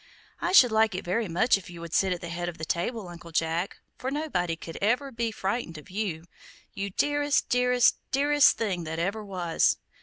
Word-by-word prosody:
I 350 - -1
should 255 - +7
like 220 -2 +3
it 185 - -5
very 205 +5 0
much 185 +5 +3
if 185 - -13
you 175 -1 -10
would 170 -1 -8
sit 190 -1 +3
at 180 - -2
the 170 - -6
head 175 +1 -3
of 170 - -9
the 160 - -5
table, 195 +6 -2
Uncle 170 -1 -11
Jack, 165 +3 -1 0.2
for 255 - -2
nobody 265 - -1
could 165 0 -9
ever 250 +7 +1
be 230 -1 -1
frightened 195 -4 -3
of 150 - -12
you, 185 -5 -3 0.5
you 200 +1 -3
dearest, 290 +7 +1
dearest, 250 -1 +3
dearest 290 +1 +4
thing 190 -6 -1
that 160 +1 -4
ever 200 +6 -2
was! 180 -5 +1
195 Hz, 205 wpm, -27 LUFS, 170-245 Hz, 0.5 s, should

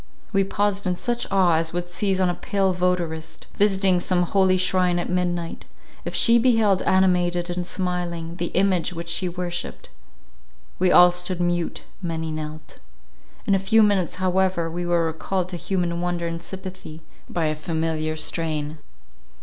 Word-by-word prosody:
We 195 -1 +3
paused 200 0 -1
in 180 - +1
such 240 +5 -2
awe 185 -4 +4
as 160 0 -1
would 175 0 -2
seize 190 +2 -1
on 185 - +3
a 175 - +1
pale 195 +1 0
votarist, 170 -3 -2
visiting 195 -3 +3
some 180 0 +1
holy 185 +1 +3
shrine 180 -1 +2
at 175 - -2
midnight; 175 -2 -2 0.4
if - - -4
she 235 0 +5
beheld 225 -6 +3
animated 180 -2 +2
and 175 0 -3
smiling, 175 -3 -3
the 175 - -2
image 185 -2 +2
which 170 0 -6
she 180 +2 0
worshipped. 175 0 -5 0.9
We 185 0 +3
all 180 0 +8
stood 180 0 -2
mute; 175 -1 -1 0.2
many 160 -2 -3
knelt. 155 0 -7 0.7
In - - +2
a 195 - +3
few 215 +3 +4
minutes 200 -5 +1
however, 185 -2 0
we 175 +1 -3
were 170 -1 +2
recalled 180 +3 -2
to 180 - -5
human 175 -2 -2
wonder 175 -1 -2
and 165 0 -4
sympathy 185 -4 -9 0.3
by 170 -2 -1
a 155 - +1
familiar 160 0 -2
strain. 155 -1 -2
175 Hz, 160 wpm, -23 LUFS, 170-190 Hz, 0.9 s, all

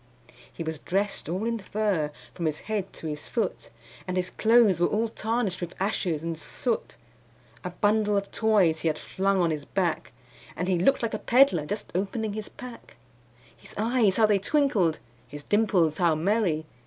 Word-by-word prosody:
He 165 - -6
was 160 -1 -4
dressed 195 0 -2
all 185 +6 -2
in 230 0 -1
fur 195 -6 -1 0.2
from 170 -3 -2
his 155 -1 -3
head 205 -3 -3
to - - -10
his 150 -1 -5
foot, 230 - -2 0.4
And 185 0 -2
his 180 0 -1
clothes 225 -5 +4
were 175 - +4
all 225 +2 0
tarnished 220 -4 -2
with 175 -1 -5
ashes 180 -5 -1
and 165 0 -2
soot; 215 - -3 0.7
A - - -3
bundle 210 -1 +1
of 200 0 -3
toys 200 -8 +3
he 165 - -1
had 155 - +1
flung 195 0 0
on 170 -2 +2
his 150 -2 -3
back, 175 0 -1 0.4
And 180 - -2
he 185 -2 +2
looked 240 +7 +3
like 230 - -1
a - - -2
peddler 235 - +4
just 205 +4 -4
opening 205 +3 -2
his 215 0 -5
pack; 250 -2 -11 0.6
His - - -13
eyes 220 -2 +2
how 220 - +5
they 210 -2 +3
twinkled! 205 - +2 0.3
his 145 +3 -9
dimples 185 -7 +2
how 170 -3 +3
merry! 170 -2 +1
195 Hz, 180 wpm, -27 LUFS, 170-220 Hz, 0.7 s, how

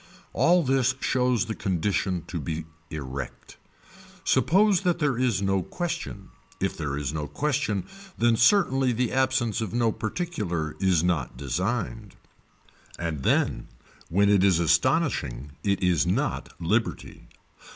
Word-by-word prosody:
All 175 +1 +4
this 130 -2 +2
shows 125 -5 +1
the 110 - -3
condition 95 -2 -1
to 85 - -5
be 80 +1 -4 0.2
erect. 70 -4 -7 0.7
Suppose 200 +1 +3
that 180 -3 +1
there 145 -5 +1
is 115 -6 +1
no 95 -1 +1
question, 165 - -5 0.3
if - - -1
there 75 -3 -3
is 70 -1 -3
no 75 -2 -3
question 140 -10 -1 0.3
then 120 0 +3
certainly 135 - +3
the 120 +1 0
absence 130 -4 +1
of 110 0 -4
no 115 -2 +2
particular 105 - -3
is 90 -4 +2
not 90 -3 -1
designed. 100 - -3 0.8
And 80 -5 -3
then - - +1 0.4
when 100 +4 +3
it 100 -2 +4
is 95 -4 +4
astonishing 80 - +1
it 100 -2 0
is 90 -4 +2
not - - -1
liberty. - - -2
105 Hz, 130 wpm, -26 LUFS, 85-130 Hz, 0.8 s, All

